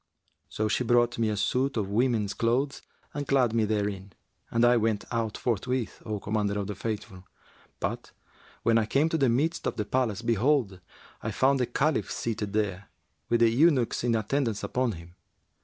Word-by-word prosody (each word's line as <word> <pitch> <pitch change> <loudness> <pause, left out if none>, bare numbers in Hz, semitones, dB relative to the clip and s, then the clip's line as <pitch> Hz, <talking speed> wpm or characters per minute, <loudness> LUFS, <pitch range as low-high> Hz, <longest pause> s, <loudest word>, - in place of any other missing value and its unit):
So 110 - -1
she 110 - 0
brought 120 0 +2
me 115 -1 +2
a 105 - -2
suit 130 +5 0
of 105 -3 0
women's 110 -2 +1
clothes 130 +5 0 0.3
and 145 -1 -4
clad 125 -5 +3
me 115 -2 +2
therein; 100 -3 -2 0.4
and 115 +1 +3
I 120 0 +5
went 110 -2 0
out 115 -2 -1
forthwith, 125 +1 -2
O 105 -1 -2
Commander 105 0 -1
of 100 - -2
the 105 - -4
Faithful; 105 -4 -5 0.6
but, - - -3 0.5
when 115 0 +4
I 110 - -1
came 145 +7 +2
to 160 - 0
the 135 -3 +3
midst 150 +8 0
of - - -2
the 105 - -2
palace, 115 -3 -1
behold, 115 -3 +1 0.4
I - - -3
found 135 +1 +2
the 125 - +1
Caliph 140 +5 0
seated 105 -3 -3
there, 100 -2 -2 0.4
with 120 0 +2
the 115 - +6
eunuchs 130 -1 +3
in 120 -1 +2
attendance 115 0 -1
upon 125 -2 0
him. 85 0 -12
115 Hz, 180 wpm, -28 LUFS, 105-125 Hz, 0.6 s, the